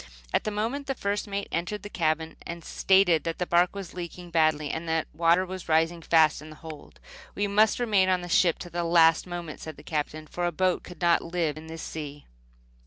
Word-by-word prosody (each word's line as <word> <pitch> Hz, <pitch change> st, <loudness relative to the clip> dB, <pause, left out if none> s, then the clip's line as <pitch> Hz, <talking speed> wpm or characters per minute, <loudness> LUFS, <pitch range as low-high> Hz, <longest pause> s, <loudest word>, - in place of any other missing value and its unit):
At -, -, +1 dB
that -, -, 0 dB
moment 230 Hz, +7 st, -2 dB
the 270 Hz, -, -1 dB
first 205 Hz, -1 st, -2 dB
mate 200 Hz, 0 st, -3 dB
entered 180 Hz, +5 st, -3 dB
the -, -, -5 dB
cabin 160 Hz, -4 st, -1 dB
and 170 Hz, 0 st, -7 dB
stated 190 Hz, -5 st, +3 dB
that 165 Hz, -1 st, -3 dB
the 180 Hz, -, -1 dB
bark 175 Hz, +2 st, +2 dB
was 195 Hz, -3 st, -7 dB
leaking 175 Hz, 0 st, -7 dB
badly. 155 Hz, -2 st, +2 dB
The 160 Hz, 0 st, -1 dB
water 170 Hz, +2 st, +3 dB
was 185 Hz, -2 st, -8 dB
rising 165 Hz, +2 st, +2 dB
fast 160 Hz, -2 st, +3 dB
in 155 Hz, -, -11 dB
the 155 Hz, -, -11 dB
hold. 155 Hz, -1 st, -11 dB, 0.4 s
"We 205 Hz, -, 0 dB
must 210 Hz, +3 st, +3 dB
remain 205 Hz, -6 st, +3 dB
on 185 Hz, -1 st, +2 dB
the 175 Hz, -, -6 dB
ship 175 Hz, -1 st, +3 dB
to 175 Hz, -, -11 dB
the 175 Hz, +1 st, -2 dB
last 165 Hz, 0 st, +4 dB
moment," 175 Hz, -3 st, -6 dB
said 160 Hz, -2 st, -8 dB
the -, -, -13 dB
Captain, 155 Hz, 0 st, -3 dB
"for 175 Hz, +3 st, -2 dB
a -, -, -1 dB
boat 185 Hz, +2 st, +1 dB
could 180 Hz, -3 st, -12 dB
not 170 Hz, -1 st, +4 dB
live 170 Hz, -3 st, -1 dB
in 155 Hz, +1 st, -10 dB
this 160 Hz, 0 st, -7 dB
sea." 145 Hz, -2 st, -7 dB
170 Hz, 220 wpm, -27 LUFS, 160-185 Hz, 0.4 s, last